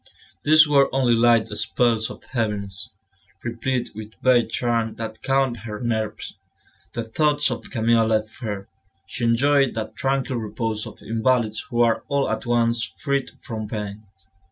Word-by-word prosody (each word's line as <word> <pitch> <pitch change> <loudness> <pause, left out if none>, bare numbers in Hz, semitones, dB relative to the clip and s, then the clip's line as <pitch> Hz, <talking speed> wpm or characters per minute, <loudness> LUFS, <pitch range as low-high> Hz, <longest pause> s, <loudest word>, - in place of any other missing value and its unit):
These 155 +1 +7
were 140 -2 +4
only 130 -3 +3
light 115 -1 +4
spells 115 -3 +1
of - - -10
heaviness, 105 -5 -3 0.5
replete 120 +2 -2
with 110 +1 -9
vague 125 -2 +4
charm 115 -2 0
that 110 -1 -6
calmed 135 -2 +1
her 105 -1 -7
nerves. 110 -3 -2 0.6
The 115 - -3
thoughts 145 +4 +2
of 120 - -5
Camille 115 -2 +2
left 110 0 -1
her; 105 -4 -4 0.4
she 120 +5 -3
enjoyed 135 +3 +3
that 110 -1 -4
tranquil 135 -1 0
repose 110 0 -3
of - - -12
invalids 115 -1 +1
who 120 -2 +1
are 115 -1 +3
all 140 -1 +1
at - - -3
once 115 -1 +2
freed 140 +3 -2
from 110 -2 -5
pain. 105 -1 -5
115 Hz, 150 wpm, -23 LUFS, 110-130 Hz, 0.6 s, These